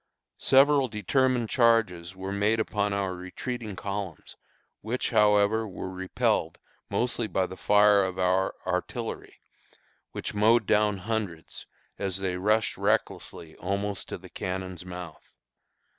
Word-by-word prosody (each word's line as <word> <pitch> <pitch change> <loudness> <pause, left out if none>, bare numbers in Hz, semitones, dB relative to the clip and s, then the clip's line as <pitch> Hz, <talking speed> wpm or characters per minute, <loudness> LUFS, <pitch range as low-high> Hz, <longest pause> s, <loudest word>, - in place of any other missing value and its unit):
Several 140 +1 +5
determined 120 +2 +1
charges 105 -8 +2
were 95 +1 -5
made 100 +3 +1
upon 105 -2 0
our 100 -2 -1
retreating 105 +4 -6
columns, 100 -3 -5 0.5
which, 115 +4 -2
however, 105 0 +4
were 95 -1 -6
repelled 90 -3 0 0.3
mostly 120 -2 -1
by 95 -3 0
the 95 - -8
fire 105 +1 +5
of 95 -1 -3
our 95 +1 +1
artillery, 95 +6 -4 0.7
which - - -5
mowed 110 +2 +4
down 105 0 +2
hundreds 95 -5 -4 0.3
as 95 -2 -2
they 95 -2 -2
rushed 110 +4 +1
recklessly 80 -2 -2
almost 100 +1 -3
to - - -4
the - - -13
cannon's 90 -1 -5
mouth. 90 -3 -9
100 Hz, 125 wpm, -27 LUFS, 95-110 Hz, 0.7 s, Several